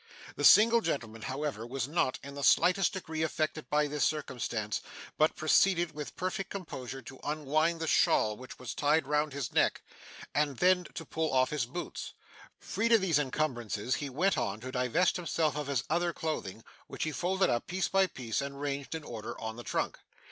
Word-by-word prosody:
The - - -4
single 230 +2 +7
gentleman, 115 - -3
however, 135 -1 -3
was 125 +1 -3
not 145 -4 0
in 140 0 -8
the 140 0 -6
slightest 185 +6 +4
degree 160 -4 -4
affected 155 -1 -1
by 150 0 +3
this 145 0 -1
circumstance, 120 -7 -1 0.3
but 155 +1 +3
proceeded 175 +1 +3
with 150 -1 -7
perfect 185 +1 -3
composure 135 -9 -6
to 135 - -11
unwind 155 +3 0
the 165 - -2
shawl 110 -8 +3
which 130 +3 -11
was 125 -1 -6
tied 150 +1 +2
round 150 +1 +1
his 140 -2 -4
neck, - - +2 0.5
and 145 -3 +1
then 180 +2 +4
to 165 - -5
pull 160 -1 -1
off 130 0 +3
his 145 -6 -1
boots. 175 +8 -6 0.4
Freed 230 +1 0
of 225 - +6
these 170 -6 +3
encumbrances, 125 -6 -1
he 145 - -4
went 180 +10 +1
on 100 +2 -2
to 130 +1 -6
divest 130 +10 +2
himself 165 -4 0
of 150 -2 -3
his 140 -4 0
other 170 +2 +1
clothing, 115 -11 -4 0.2
which - - -4
he 155 - -1
folded 190 +4 +1
up, 120 - -1
piece 185 +1 0
by 195 0 +3
piece, 125 -8 -3
and 140 0 -6
ranged 140 +1 -3
in 160 - -5
order 115 -6 -7
on 110 0 -4
the 120 - -8
trunk. - - -2
150 Hz, 190 wpm, -31 LUFS, 130-170 Hz, 0.5 s, single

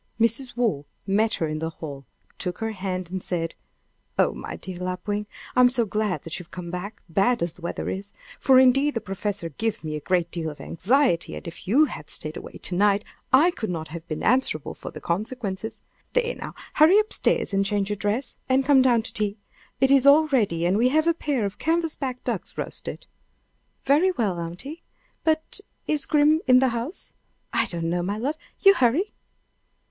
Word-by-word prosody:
Mrs. 235 +2 +1
Waugh 205 -13 0 0.2
met 215 +3 +2
her 160 - -1
in 155 0 -3
the 160 +1 -2
hall, 145 -4 -8 0.3
took 180 -1 -3
her 225 0 -2
hand, 185 -3 -4
and 190 0 -3
said: 165 -2 -2 0.6
"Oh, - - +3
my - - -6
dear 185 -2 -7
Lapwing! 185 +3 -3 0.3
I'm 250 0 +7
so 245 -2 +2
glad 210 -2 -1
you 165 - -8
have 165 - -23
come 175 -2 -7
back, 180 +4 -6
bad 200 +7 +2
as 170 -1 -2
the 180 - -18
weather 170 - -4
is; 200 +2 -4 0.3
for 265 -2 +5
indeed 270 +3 +5
the - - +1
professor 200 -3 -3
gives 220 +7 -2
me 155 -1 -3
a - - -3
great 175 +2 0
deal 165 -2 -2
of 150 - -10
anxiety, 230 - +1
and - - -8
if 170 +1 -9
you 275 +10 +5
had 150 - -8
stayed 155 +1 -1
away - - -8
to - - -6
night 205 +2 +3 0.3
I 300 +7 +6
could 220 - -4
not 160 -3 -4
have 165 +1 -8
been 155 - -4
answerable 250 - +1
for - - -8
the - - -9
consequences. 210 +2 -3 0.3
There, - - +1
now; - - -8 0.2
hurry 320 +6 +6
up 430 +1 +2
stairs - - +3
and 195 0 +3
change 200 0 0
your - - 0
dress, 215 +6 -1
and 260 +1 +3
come 275 -2 +6
down 240 -3 +4
to - - -6
tea. 210 0 -1 0.4
It 265 +1 +4
is 275 0 +5
all 300 +3 +7
ready, 200 - +1
and 185 +4 +2
we 245 +2 +4
have 310 +4 +2
a 335 - +4
pair 285 -8 -1
of 200 - -5
canvasback 315 -6 -1
ducks - - -4
roasted." - - -5 0.8
"Very 295 +7 +4
well, 215 - -1
aunty! 180 - -6 0.4
But 315 +4 0 0.3
is 300 -2 0
Grim 300 +1 +4
in 255 -1 +7
the 260 0 +4
house?" 240 +9 -5 0.4
"I - - +2
don't 165 -1 -2
know, 175 0 0
my 200 +4 -2
love. 280 +7 -2 0.2
You 390 - +8
hurry." 325 - +2
215 Hz, 200 wpm, -25 LUFS, 180-265 Hz, 0.8 s, You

